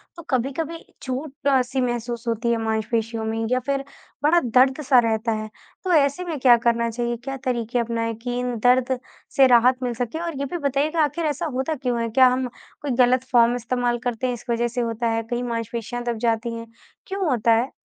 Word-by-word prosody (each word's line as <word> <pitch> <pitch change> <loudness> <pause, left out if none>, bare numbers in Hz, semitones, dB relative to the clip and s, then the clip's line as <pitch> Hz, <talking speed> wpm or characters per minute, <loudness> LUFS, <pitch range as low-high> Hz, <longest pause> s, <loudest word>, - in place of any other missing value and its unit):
तो 335 - -10
कभी-कभी 280 +6 -2 0.2
छूट-सी 265 -1 -1
महसूस 240 -1 -3
होती 230 +1 0
है 235 - +2
मांसपेशियों 220 +1 -1
में 225 0 -2
या 255 - +3
फिर 275 +2 -2 0.4
बड़ा 335 +4 +5
दर्द-सा 260 +2 +4
रहता 220 +1 0
है। 215 0 -3 0.3
तो 370 - -1
ऐसे 285 +3 +3
में 325 -4 -3
क्या 250 -2 +7
करना 235 0 +2
चाहिए? 240 +1 -2
क्या 270 +3 -6
तरीके 245 -2 -1
अपनाएँ 230 -1 -1
कि 245 0 -2
इन 250 -1 -2
दर्द 250 +1 +3 0.4
से 270 -1 +7
राहत 250 +1 +4
मिल 245 -1 -1
सके? 245 +6 -3
और 335 -4 -4
ये 280 - -1
भी 350 +6 -4
बताइएगा, 300 +4 +1
आखिर 300 +3 -1
ऐसा 300 +3 -1
होता 265 +5 -1
क्यों 250 -4 -1
है? 230 - -1
क्या 255 +3 +6
हम 255 0 +1 0.3
कोई 290 -2 -2
गलत 250 +1 +2
फ़ॉर्म 240 -1 +5
इस्तेमाल 245 0 -1
करते 245 0 -1
हैं, 250 - -1
इस 240 - -9
वजह 235 0 +1
से 240 +1 -3
होता 230 0 -1
है, 225 0 0
कई 240 0 -1
मांसपेशियाँ 235 0 -4
दब 240 -1 -2
जाती 230 +1 0
हैं? 230 0 -7 0.4
क्यों 390 0 -2
होता 235 -3 +2
है? 235 +4 +1
245 Hz, 200 wpm, -23 LUFS, 230-270 Hz, 0.4 s, क्या